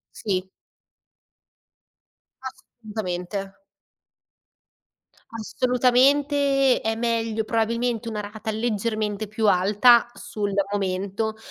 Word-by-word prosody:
Sì. 190 -3 -2 2.0
Assolutamente. 200 -6 -6 1.8
Assolutamente. 265 +4 +2
È 225 0 -1
meglio 225 -1 -1
probabilmente 230 +1 -1
una 215 -2 -3
rata 215 +2 -6
leggermente 215 -1 -2
più 215 0 0
alta, 210 +6 +5
sul 210 -4 -4 0.2
momento, 200 +3 -2
220 Hz, 70 wpm, -24 LUFS, 205-240 Hz, 2.0 s, alta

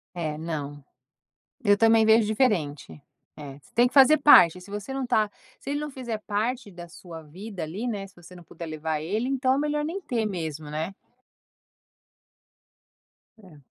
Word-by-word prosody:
É, 155 -3 -3
não. 145 -3 -5 0.8
Eu 205 -2 +4
também 225 0 +4
vejo 220 0 +5
diferente. 165 - -1 0.4
É, 140 -2 -9
você 145 - -25
tem 240 +1 +5
que - - -20
fazer 280 +2 +7
parte, 180 - +7
se 200 +2 -14
você 210 +6 -6
não 270 -1 -3
está 215 -4 +1 0.3
se 275 - -7
ele 290 - -1
não 300 - -5
fizer 245 -5 -5
parte 220 +2 -2
da 175 -1 -11
sua 165 -1 -11
vida, 185 +6 -9
ali, 185 +10 -5
né, 200 -3 -4
se 195 - -20
você 175 +1 -15
não 175 - -13
puder 170 0 -9
levar 155 0 -3
ele, 210 +11 -2
então 265 -1 +1
é - - -1
melhor 295 0 -1
nem 345 +6 -4
ter 230 -7 -2
mesmo, 160 -6 -5
né. 155 +5 -4 2.5
É. 180 -8 -17
200 Hz, 175 wpm, -25 LUFS, 160-240 Hz, 2.5 s, fazer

